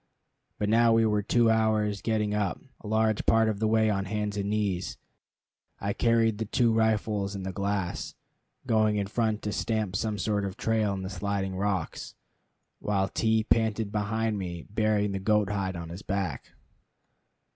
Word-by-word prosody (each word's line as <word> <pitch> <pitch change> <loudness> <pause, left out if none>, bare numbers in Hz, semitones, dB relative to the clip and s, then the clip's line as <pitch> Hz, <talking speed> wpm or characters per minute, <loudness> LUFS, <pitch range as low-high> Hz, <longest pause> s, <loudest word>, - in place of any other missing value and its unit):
But 105 - -1
now 115 +1 +4
we 115 0 +4
were 105 -1 +2
two 115 +2 +3
hours 110 -2 +1
getting 105 -2 0
up, 105 -2 -1 0.2
a - - -10
large 110 0 +1
part 115 0 +4
of 105 -2 -1
the 110 - +1
way 110 0 +3
on 95 -1 -1
hands 105 +1 -2
and 100 -1 -2
knees. 100 -4 -1 0.8
I 100 +1 -1
carried 115 -2 +2
the 110 - -1
two 115 +1 +2
rifles 105 -2 +1
and 95 -1 -5
the 95 - -4
glass, 100 -2 -2 0.5
going 110 -3 +2
in 100 -1 0
front 110 +1 -1
to 105 - -2
stamp 110 -3 -1
some 105 +1 -1
sort 105 -1 0
of 100 -1 -3
a - - -22
trail 110 -2 +1
in 95 - -5
the 95 - -4
sliding 95 0 -2
rocks, 95 -3 -2 0.6
while 95 -2 0
T 110 +2 +1
panted 110 -2 +1
behind 110 0 -1
me, 85 -3 -5
bearing 105 -1 +1
the 95 - -2
goat 105 0 +2
hide 95 -2 -2
on 85 -1 -6
his 85 +3 -7
back. 95 -8 -3
105 Hz, 180 wpm, -28 LUFS, 100-110 Hz, 0.8 s, now